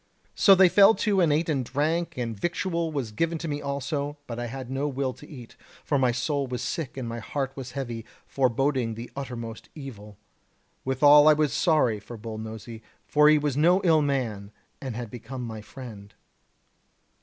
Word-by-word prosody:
So 195 - +6
they 190 0 +7
fell 200 +4 +6
to 200 -4 +1
and 165 -4 +3
ate 155 +3 +1
and 140 -5 0
drank, 160 +6 -1
and 115 -3 -3
victual 170 - -2
was 135 -7 -3
given 165 +9 -1
to 165 - -5
me 145 -1 -3
also, 140 +1 -3
but 120 -2 -6
I 120 - -3
had 130 +2 -7
no 135 +2 -1
will 135 -2 -2
to 150 - -15
eat, 125 -6 -11 0.3
for 145 - +1
my 130 -2 +3
soul 135 +3 -1
was 125 -1 -4
sick 155 -6 -4
and 130 -3 -4
my 115 0 -4
heart 135 +1 -3
was 130 -2 -7
heavy, 120 -5 -4 0.2
foreboding 130 -2 0
the 115 +2 -8
uttermost 120 -5 -7
evil. 105 -9 -10 0.7
Withal 145 +3 +6
I 155 - +8
was 150 -3 +1
sorry 150 - +2
for 115 +3 -10
Bull 110 0 -7
Nosy, 110 +1 -8 0.2
for 150 0 +5
he 155 - +6
was 145 -3 -1
no 170 +6 +4
ill 160 -4 +4
man 115 -8 -2 0.3
and 130 -4 -5
had 120 -2 -6
become 125 +2 -7
my 110 -2 -6
friend. 105 -4 -10
135 Hz, 190 wpm, -26 LUFS, 120-150 Hz, 0.7 s, I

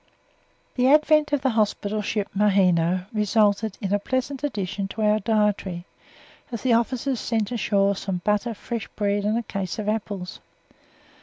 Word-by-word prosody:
The 250 0 +2
advent 305 0 +4
of 290 -2 +1
the 265 - +1
hospital 215 -1 0
ship 205 0 -2
Maheno 185 -3 +3
resulted 210 -1 +1
in 195 0 -1
a 205 - +2
pleasant 260 +5 -3
addition 195 -7 -2
to 215 +2 -4
our 210 0 +3
dietary, 205 -4 0 0.7
as 235 - -5
the 255 -2 +3
officers 245 +2 0
sent 220 -2 -1
ashore 200 -3 +1
some 190 -2 -4
butter, 210 +2 0
fresh 230 +2 -5
bread 205 -1 0
and 215 +2 +1
a 235 - -2
case 195 -4 -4
of 215 -2 -4
apples. 200 -4 -3
210 Hz, 155 wpm, -24 LUFS, 200-230 Hz, 0.7 s, advent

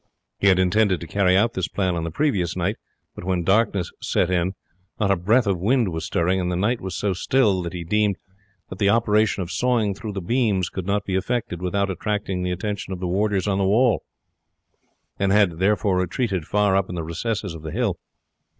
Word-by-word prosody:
He 100 - +2
had 95 -2 +5
intended 95 +1 +2
to - - -5
carry 95 +1 +2
out 115 +3 +2
this 95 -2 -2
plan 95 -3 -1
on 85 - -2
the - - -2
previous 90 - 0
night, 90 +5 -1 0.4
but - - -9
when 90 -1 -1
darkness 95 -2 +1
set 90 - 0
in 90 +1 0 0.4
not 100 -3 +2
a - - +4
breath 110 +8 +2
of 95 -3 0
wind 115 +3 +2
was 80 -1 -4
stirring, 90 +3 +1
and 90 0 -1
the - - -1
night 110 +7 0
was 95 -1 -5
so 100 -2 0
still 105 -1 +2
that 85 0 -5
he 90 -1 -5
deemed 105 +3 +1 0.5
that 95 - -8
the 100 - +3
operation 105 -2 +2
of 85 - -7
sawing 115 -2 +1
through 105 +1 -7
the 100 - -3
beams 100 -3 +1
could 95 -1 -6
not 100 0 0
be 95 - -3
effected 95 -2 -2
without 100 +2 0
attracting 95 0 -2
the 90 - -1
attention 100 +2 -4
of 95 - -4
the 90 - -3
warders 100 +1 0
on 100 -1 +1
the - - +2
wall, 115 +4 +3 1.2
and 95 0 +2
had 100 -5 +3
therefore 100 -1 +2
retreated 90 - -1
far 105 -2 +2
up 95 -1 +1
in 90 - -5
the 85 - -3
recesses 95 +4 -3
of 80 - -9
the 80 - -6
hills. - - -1
95 Hz, 215 wpm, -23 LUFS, 90-105 Hz, 1.2 s, had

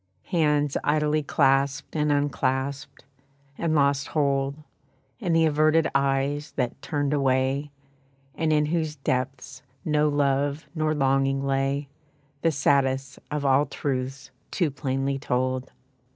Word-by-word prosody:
Hands 150 -4 +2
idly 150 +1 +2
clasped 140 0 +1
and 150 -1 +1
unclasped, 140 -1 -1 0.5
and 160 +1 -1
lost 140 -1 +2
hold, 140 -2 0 0.6
And 180 -7 0
the 165 0 +4
averted 155 +1 +3
eyes, 140 +2 0
that 125 -2 -2
turned 145 -1 -1
away, 135 +1 +1 0.6
And 160 -1 0
in 150 -1 +3
whose 155 -1 -1
depths 130 -1 -3 0.2
no 150 -1 +2
love 145 +1 0
nor 155 -2 0
longing 135 0 +1
lay, 135 +1 0 0.5
The 165 - +3
saddest 135 -1 +1
of 150 -1 -3
all 135 +2 +4
truths 135 -1 -4 0.2
too 170 -6 0
plainly 135 0 -2
told. 130 -1 -1
140 Hz, 120 wpm, -25 LUFS, 135-150 Hz, 0.6 s, the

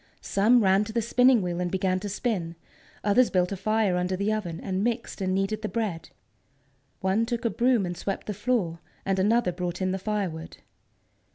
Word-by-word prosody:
Some 225 +4 +3
ran 190 +1 +4
to 220 - -7
the 235 - +1
spinning 250 -1 +4
wheel 175 -1 -2
and 180 - -1
began 185 0 0
to 205 +2 -5
spin, 190 -5 -2 0.5
others 230 +4 +4
built 180 -1 +1
a - - -1
fire 210 -1 +1
under 180 +1 0
the 200 +3 0
oven, 175 -6 -3
and 190 0 -2
mixed 235 -2 -2
and 185 0 0
kneaded 195 +3 -1
the 215 - -3
bread. 205 -8 -3 0.9
One 190 +4 +2
took 235 0 -3
a 230 - +2
broom 235 -1 +2
and 175 0 -4
swept 195 +3 -4
the 210 - -3
floor, 205 -6 -1 0.3
and 195 -1 +1
another 220 0 +3
brought 175 0 -4
in 185 -1 0
the 190 - -2
firewood. 190 -6 -3
195 Hz, 195 wpm, -26 LUFS, 185-225 Hz, 0.9 s, ran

